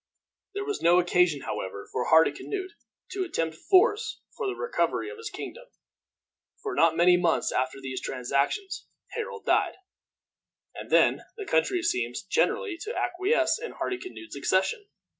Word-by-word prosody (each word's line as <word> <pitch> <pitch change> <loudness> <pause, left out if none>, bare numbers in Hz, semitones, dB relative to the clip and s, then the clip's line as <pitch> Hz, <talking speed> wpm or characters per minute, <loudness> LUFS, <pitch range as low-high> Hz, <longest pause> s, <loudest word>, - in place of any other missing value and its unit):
There 405 0 -2
was 420 -1 -3
no 175 +1 +5
occasion, 175 -4 +3
however, 100 -2 -5
for 125 - -1
Hardicanute 375 - +2 0.4
to 385 0 -1
attempt 165 - -2
force 405 - +3 0.2
for 450 - -3
the 390 - -2
recovery 475 -2 -1
of 455 - -10
his 450 -1 -5
kingdom, 480 +5 -8 1.0
for 405 -3 -3
not 165 -1 +3
many 180 +1 +6
months 175 -2 +1
after 130 +1 -1
these 130 -1 -5
transactions 140 - -1 0.2
Harold 460 -1 -5
died, - - +2 1.0
and - - -8
then - - +4 0.2
the 415 - -5
country 375 -2 +1
seemed 350 +2 0 0.2
generally 435 -7 +1
to 445 +3 -4
acquiesce 375 +6 +1
in 475 - -6
Hardicanute's 370 -2 -5
accession. 400 - 0
365 Hz, 140 wpm, -27 LUFS, -, 1.0 s, many